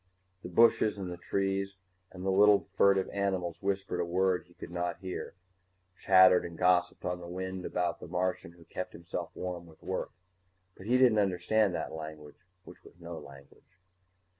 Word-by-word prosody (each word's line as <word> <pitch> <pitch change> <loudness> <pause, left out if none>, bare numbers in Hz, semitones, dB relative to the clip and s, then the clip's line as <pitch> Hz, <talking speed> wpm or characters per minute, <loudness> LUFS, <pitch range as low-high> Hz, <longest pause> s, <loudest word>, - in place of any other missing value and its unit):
_The 90 - -7
bushes 110 +1 +4
and 95 -2 -5
the - - -4
trees 95 +1 -2 0.3
and 90 0 -8
the 95 - +2
little 100 +1 +5
furtive 100 -1 +4
animals 95 -4 -2
whispered 95 -2 -2
a - - +2
word 90 +1 +1
he 85 - -23
could - - -9
not 85 -1 -2
hear, 95 -1 -6 0.6
chattered 95 0 +6
and 85 -1 -8
gossiped 90 0 +2
on 90 0 -2
the 85 - -9
wind 95 +1 -5
about 90 -1 -1
the - - -9
Martian 90 -1 -2
who 85 -1 -17
kept - - -6
himself 85 0 -6
warm 90 -2 -5
with 80 - -18
work. - - -3 0.7
But 95 - -11
he 125 +2 +4
didn't 125 -4 +5
understand 100 0 +2
that 80 - -4
language 80 -2 -8 0.2
which - - -14
was 85 - -17
no 85 -1 -7
language. 70 +4 -16
90 Hz, 175 wpm, -30 LUFS, 85-95 Hz, 0.7 s, chattered